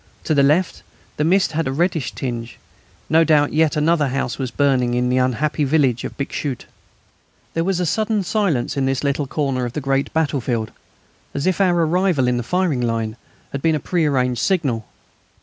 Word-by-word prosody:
To 155 - 0
the 140 - +4
left 155 +6 +2 0.4
the 150 - +1
mist 185 +4 +3
had 160 -1 -1
a - - -1
reddish 160 -2 -1
tinge. 120 -3 -5 0.5
No 160 +1 +4
doubt 150 -3 +3
yet 155 0 +2
another 150 -1 +2
house 135 0 -2
was 130 -2 -2
burning 125 -2 +1
in 125 0 +1
the 125 +1 +2
unhappy 135 +4 0
village 135 -4 +2
of - - -6
Bixschoote. 140 -1 -4 0.9
There 165 - 0
was 185 0 0
a 180 - 0
sudden 215 +3 0
silence 175 - 0
in 135 -1 0
this 135 0 -1
little 140 0 0
corner 135 -3 -1
of 120 -1 -3
the - - -2
great 135 0 -1
battlefield, 130 -8 -1 0.6
as 140 - -2
if 185 +1 +1
our 175 -3 +3
arrival 175 -5 +1
in 125 0 +1
the - - -1
firing 170 -1 0
line 115 -2 -1 0.4
had 140 - -4
been 160 +1 +2
a - - -1
prearranged 135 -7 0
signal. 140 - 0
145 Hz, 185 wpm, -20 LUFS, 125-165 Hz, 0.9 s, the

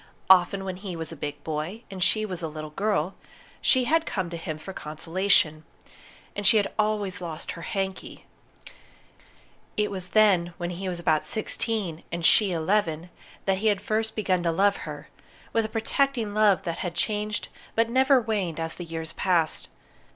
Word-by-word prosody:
Often, 190 +1 +5
when 185 -1 -4
he 190 -2 -6
was 165 0 -5
a - - -7
big 145 -1 -6
boy 160 +9 -4
and 190 -1 -6
she 215 +3 +2
was 185 -4 -4
a 165 - -2
little 155 0 -7
girl, 195 0 0 0.5
she 260 -1 +4
had 320 +6 +3
come 185 -4 -2
to - - -4
him 155 -2 -5
for 190 +5 -8
consolation. 160 0 +1 0.7
And 205 -1 +1
she 220 - +7
had 200 -2 +1
always 210 -3 0
lost 165 -2 -5
her 170 - -8
"hanky!" 190 +1 -4 1.5
It 210 -1 +1
was 185 -2 -4
then, 185 -6 +4
when 175 -1 -3
he 185 +2 -4
was 175 -1 -3
about 155 -2 +2
sixteen, 215 -6 -2
and 170 -1 -2
she 205 +1 +6
eleven, 170 -1 0 0.3
that 190 -1 +1
he 220 - +1
had 205 -2 +3
first 220 +2 -1
begun 185 -4 +1
to 170 -1 +1
love 200 +4 +3
her, - - -8 0.5
with 225 -1 +2
a - - -4
protecting 230 0 0
love 210 -2 +4
that 170 -3 -3
had 175 -2 -3
changed 210 -1 -2 0.3
but 230 0 +3
never 260 +3 +4
waned 200 -8 -2
as 165 0 -2
the 175 - -6
years 165 -1 -5
passed. 170 -4 +1
190 Hz, 180 wpm, -26 LUFS, 170-215 Hz, 1.5 s, she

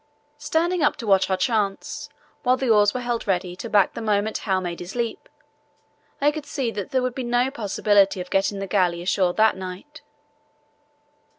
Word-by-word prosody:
Standing 335 +4 0
up 295 - +3
to 230 - -7
watch 195 -2 +3
our 190 - +1
chance, 200 -1 -1 0.3
while 255 -1 +2
the 255 -3 0
oars 205 -1 +5
were 250 - -4
held 240 -2 -3
ready 180 -2 -1
to 230 +5 -7
back 205 -3 +3
the - - -6
moment 215 0 0
Howe 195 -3 0
had 185 - 0
made 175 -1 -4
his 175 +4 -8
leap, 235 -2 -3 0.9
I 290 +1 +3
could 300 -1 -7
see 265 -6 -2
that 205 -3 -5
there 260 -1 0
would 255 -1 -1
be 260 - -4
no 245 +2 +1
possibility 205 -4 +2
of 180 0 -7
getting 195 +1 +1
the 195 - -3
galley 180 -3 +1
ashore 180 0 +1
that 220 0 +4
night. 190 +12 -9
210 Hz, 195 wpm, -23 LUFS, 190-250 Hz, 0.9 s, oars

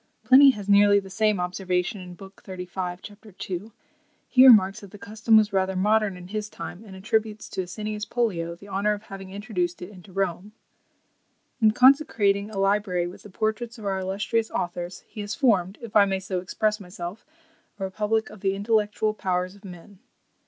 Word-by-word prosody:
Pliny 275 +2 +8
has 210 -6 -2
nearly 205 0 +6
the 195 -1 -11
same 215 -1 +1
observation, 180 0 -3
lib. 195 0 -12
xxxv. 180 -1 -6
cap. 210 +1 -12
2. 195 +3 -5 0.6
He 260 0 +7
remarks, 195 -5 +6
that 200 - -12
the 205 - -12
custom 220 0 +2
was 215 -1 +2
rather 190 0 +1
modern 210 0 +2
in 180 0 -11
his 210 0 -4
time; 180 0 -8
and 195 -3 -12
attributes 215 +2 -2
to - - -3
Asinius 210 +3 -5
Pollio 175 -9 -1
the 200 +4 -15
honour 200 +2 0
of 205 0 -7
having 195 -2 -9
introduced 190 -3 -3
it 180 +3 -8
into 190 -1 -15
Rome. 195 +1 -3 1.1
"In 220 - +6
consecrating 215 -5 +3
a 215 - -8
library 195 -2 +1
with 185 +3 -9
the 210 - -13
portraits 220 +4 -3
of 215 - -10
our 195 -1 -1
illustrious 205 +4 -1
authors, 175 0 -4
he 215 - -8
has 205 +1 -4
formed, 200 -8 +2
if 230 - -9
I 205 -1 +7
may 195 -1 -1
so 190 -1 -3
express 210 +4 -1
myself, 180 +1 -8 0.6
a - - -4
republic 210 +3 -1
of 210 - -12
the 195 -1 0
intellectual 215 +1 0
powers 185 -2 -2
of 200 +1 -19
men." 185 +1 -12
200 Hz, 180 wpm, -25 LUFS, 185-215 Hz, 1.1 s, Pliny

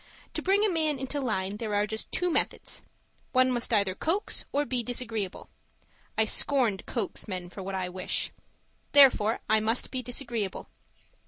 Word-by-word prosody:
To - - -2
bring 400 +3 +3
a - - +4
man 310 -4 +1
into 265 +2 -3
line, 200 -5 -2
there 215 -2 -3
are 205 0 +2
just 220 +1 -4
two 360 -1 0
methods: - - -1 0.5
one 255 0 +5
must 240 0 -1
either 200 -4 +3
coax 335 - -1
or 290 +1 +1
be 255 -3 -1
disagreeable. 230 -5 -3 0.7
I 220 - +4
scorn 245 -3 +3
to - - -12
coax 230 -3 -3
men 180 -3 -5
for 195 - -8
what 195 +1 -4
I 185 -1 -2
wish. 185 0 -1 0.6
Therefore, 245 -6 +6
I 220 +1 +4
must 225 +3 0
be 255 - -2
disagreeable. 235 -5 -3
230 Hz, 170 wpm, -28 LUFS, 205-265 Hz, 0.7 s, Therefore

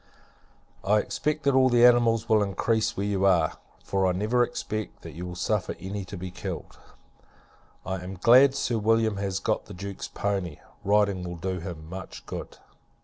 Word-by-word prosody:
I 105 +2 +3
expect, 150 +7 -1
that 140 - +3
all 130 -1 +4
animals 120 -2 +5
will 110 -1 +4
increase 110 +3 0
where 100 - -1
you 100 -2 0
are, 85 -5 +3 0.2
for 95 -1 +1
I 90 - +2
never 110 +6 +1
expect 110 -2 -5
that 80 - -8
you 90 +4 -6
will 90 - -7
suffer 105 +2 -1
any 95 +2 -5
to 95 - -8
be 90 +1 -6
killed. - - -7 1.1
I 95 0 -2
am 95 +1 -6
glad 130 +7 +6
Sir 120 -4 0
William 110 -1 +2
has 100 -1 -2
got 110 +2 -1
the 100 - -10
Duke's 100 +1 -6
poney; 95 -6 -3 0.2
riding 100 -2 +2
will 90 0 -5
do 95 +2 -3
him 80 -2 -7
much 95 +3 -8
good. - - -7
100 Hz, 175 wpm, -26 LUFS, 95-115 Hz, 1.1 s, glad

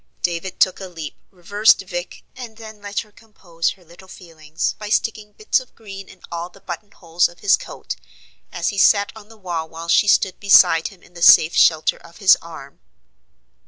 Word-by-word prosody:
David 175 +1 -3
took 185 - +2
a 190 - -7
leap, 165 -5 -8
reversed 200 +4 +2
Vic, 175 -1 -7
and 235 -4 -10
then 220 -2 -12
let 205 0 -3
her 215 - -17
compose 185 -6 -5
her 185 -3 -24
little 175 +3 -17
feelings 160 -4 -5
by 210 -1 -7
sticking 215 -1 -2
bits 215 +5 0
of 255 - -16
green 195 -3 -11
in 185 - -17
all 170 +1 -5
the 195 - -19
button 185 +2 -8
holes 170 -2 0
of 175 - -19
his 200 - +4
coat, - - -8 0.6
as 170 - -2
he 200 - -4
sat 200 0 +4
on 215 -1 -14
the 225 - -16
wall 170 -5 -5
while 165 +1 -9
she 205 - +4
stood 195 -2 +2
beside 180 -5 +5
him 195 -4 -15
in 180 - -21
the 170 - -12
safe 160 -1 +7
shelter 160 -2 +3
of 170 0 -17
his 195 -2 +6
arm. 160 -4 -12
185 Hz, 195 wpm, -20 LUFS, 170-205 Hz, 0.6 s, safe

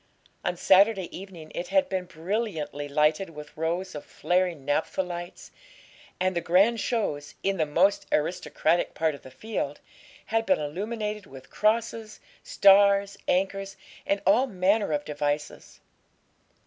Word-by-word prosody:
On 180 - -1
Saturday 195 +1 +4
evening 175 -5 -10
it 175 - -4
had 285 +5 +2
been 185 -7 -2
brilliantly 165 -4 -3
lighted 155 +5 +2
with 150 -2 -11
rows 170 +4 -2
of 150 - -7
flaring 175 -5 -1
naphtha 145 +6 0
lights; 175 0 -8 0.7
and 185 0 0
the 170 - 0
grand 195 +8 +3
shows, 150 -14 -2
in 195 0 0
the 155 -2 +1
most 185 +7 +2
aristocratic 165 +1 0
part 160 -1 +1
of 140 - -10
the - - -12
field, 150 - -4 0.5
had 225 0 -1
been 280 - +4
illuminated 210 +6 -4
with 130 -1 -13
crosses, 220 0 0 0.2
stars, 200 0 +5
anchors, 195 +1 -1 0.3
and 200 0 0
all 225 +8 +4
manner 200 -1 +1
of 145 -1 -1
devices. 145 0 -4
185 Hz, 135 wpm, -27 LUFS, 155-205 Hz, 0.7 s, stars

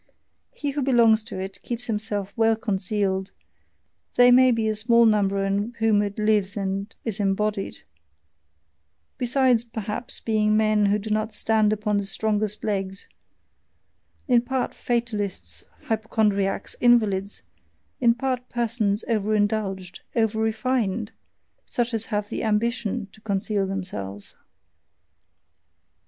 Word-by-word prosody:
He 290 -1 -2
who 285 +1 -2
belongs 235 -4 +4
to 190 - -6
it 190 +1 -6
keeps 240 0 -4
himself 210 -3 -3
well 225 -1 +3
concealed: 195 -2 -1 0.9
they 245 0 +7
may 255 +1 +7
be 230 -2 +1
a 215 - 0
small 235 +2 +4
number 200 -2 +2
in 205 +4 -1
whom 220 -2 +3
it 200 -1 -3
lives 210 -2 +1
and 195 +1 -2
is 220 -2 -3
embodied, 205 0 -1 1.4
besides 250 -1 +3
perhaps 230 +2 -4
being 215 -1 +2
men 215 -1 +3
who 205 +1 +3
do 210 +1 -6
not 215 +1 -1
stand 220 -1 +2
upon 210 -1 0
the 200 - -1
strongest 210 +1 0
legs, 195 -2 -3 1.2
in 245 -3 +5
part 255 +1 -2
fatalists, 205 - -3 0.2
hypochondriacs, 210 -3 0
invalids, 210 -5 +2 0.6
in 235 -2 +4
part 255 -1 -2
persons 225 -3 0
over 215 -2 +1
indulged, 200 -3 -1 0.2
over 220 -2 +1
refined, 220 -1 -1 0.6
such 240 0 -1
as 225 -1 0
have 210 -2 -2
the - - -3
AMBITION 220 0 -1
to 215 - -18
conceal 200 -1 -1
themselves. 105 - -6
215 Hz, 125 wpm, -24 LUFS, 200-230 Hz, 1.4 s, they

